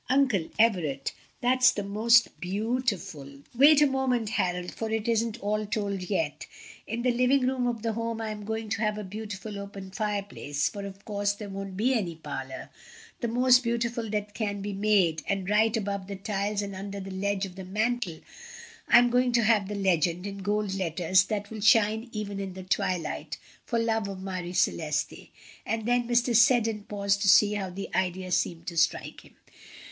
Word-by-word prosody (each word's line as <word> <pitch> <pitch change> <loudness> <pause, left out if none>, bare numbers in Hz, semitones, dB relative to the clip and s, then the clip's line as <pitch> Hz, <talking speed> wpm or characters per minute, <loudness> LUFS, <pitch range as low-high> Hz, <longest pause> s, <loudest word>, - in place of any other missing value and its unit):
"Uncle 250 -10 +2
Everett, 175 -12 +1 0.3
that's 255 +1 +5
the 205 - -2
most 225 +4 +4
beautiful" 185 - -3
"Wait 290 +4 +7
a - - +6
moment, 260 -5 0
Harold, 180 -4 -1
for 225 - -4
it 220 0 -2
isn't 230 0 0
all 210 +1 0
told 205 -2 -2
yet. 160 -8 -2 0.4
In 230 +2 -3
the 250 - +3
living 255 +3 +3
room 255 -1 0
of 230 -2 -3
the 225 -1 0
Home 230 0 -3
I 220 -1 -3
am 210 -1 -7
going 220 +1 -3
to 205 0 -2
have 210 -1 0
a 210 - -4
beautiful 205 +1 -6
open 200 -1 -8
fireplace 200 -8 -2
(for 200 -1 -6
of 195 0 -12
course 205 -1 0
there 205 0 -8
won't 195 -1 -6
be 245 +6 +2
any 185 -9 -1
parlor) 140 -4 -7 0.5
the 235 - -1
most 250 +2 +5
beautiful 235 -1 -2
that 210 -1 -3
can 205 -3 -2
be 200 +1 -4
made 195 -6 +2
and 195 -2 -1
right 220 +2 +3
above 200 -2 -3
the 200 - -5
tiles 205 +1 -2
and 200 -1 -5
under 200 +1 -6
the 195 0 -7
ledge 200 +1 -1
of 185 -2 -10
the 190 - -7
mantel 210 -2 -2 0.7
I - - +7
am 245 0 +5
going 250 0 +3
to 235 -1 +4
have 215 -3 +3
the 205 - -4
legend, 180 -2 +1
in 200 0 -5
gold 205 0 -1
letters, 185 0 +2
that 205 -1 -4
will 220 -1 -6
shine 220 +2 +4
even 205 -2 -4
in 195 -2 -4
the 190 - -7
twilight, 180 -1 -2 0.3
'For 235 - -1
love 225 -2 0
of 195 -1 -6
Marie 185 -2 -5
Celeste" 155 -4 -1 0.4
and 225 -1 -2
then 245 0 +1
Mr. 240 0 +2
Selden 225 -3 +4
paused 200 -1 0
to 200 - +3
see 210 +1 +6
how 200 -2 -3
the 195 +2 -7
idea 185 0 -1
seemed 170 -1 0
to 170 - -5
strike 160 - 0
him. - - -20
205 Hz, 190 wpm, -27 LUFS, 190-230 Hz, 0.7 s, Wait